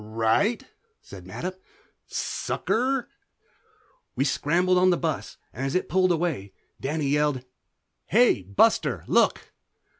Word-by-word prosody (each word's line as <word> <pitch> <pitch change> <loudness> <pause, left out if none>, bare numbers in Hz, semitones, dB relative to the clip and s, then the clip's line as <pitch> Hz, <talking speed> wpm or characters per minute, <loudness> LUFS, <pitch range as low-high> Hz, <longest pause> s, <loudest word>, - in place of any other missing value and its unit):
"Right," 115 - +1 0.4
said - - -12
Mattup. 185 +1 -6 0.5
"Sucker." 255 +2 -1 1.1
We - - +1
scrambled 175 +6 +2
on 185 0 +5
the 175 - +3
bus 160 -3 -3 0.2
and 130 - -5
as 135 +3 -2
it 185 - 0
pulled 185 0 +3
away 160 - -2 0.3
Danny 150 +2 -2
yelled 145 -3 +1 0.6
"Hey, 235 - +4
Buster, 95 +2 +2
look!" - - +1
160 Hz, 115 wpm, -25 LUFS, 135-185 Hz, 1.1 s, on